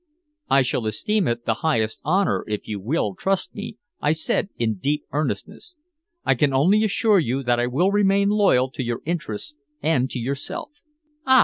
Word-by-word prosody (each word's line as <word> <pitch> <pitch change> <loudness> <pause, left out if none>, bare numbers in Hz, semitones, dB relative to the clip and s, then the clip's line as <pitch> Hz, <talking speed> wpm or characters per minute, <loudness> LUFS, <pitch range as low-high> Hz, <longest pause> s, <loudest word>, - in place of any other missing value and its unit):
"I 135 - +5
shall 125 -2 -1
esteem 200 - 0
it 120 0 -2
the 115 - +2
highest 115 -9 0
honor 185 +6 +1
if 105 -1 -4
you 105 -2 -4
will 105 -1 -1
trust 195 - -1
me," 210 +1 -7 0.2
I 150 - +3
said 160 +4 0
in 110 -4 -1
deep 145 +6 0
earnestness. 150 - -3 0.5
"I - - +4
can 140 -3 +1
only 190 +11 +4
assure 215 -1 +3
you 135 -3 -1
that 120 -1 +2
I 120 - +1
will 170 +10 +2
remain 200 0 +3
loyal 190 -12 +3
to 130 - -4
your 120 -1 -3
interests 155 -5 -4 0.2
and 140 -4 +1
to - - -5
yourself." 135 - -4 0.6
"Ah! 260 0 +7
145 Hz, 180 wpm, -23 LUFS, 120-195 Hz, 0.6 s, Ah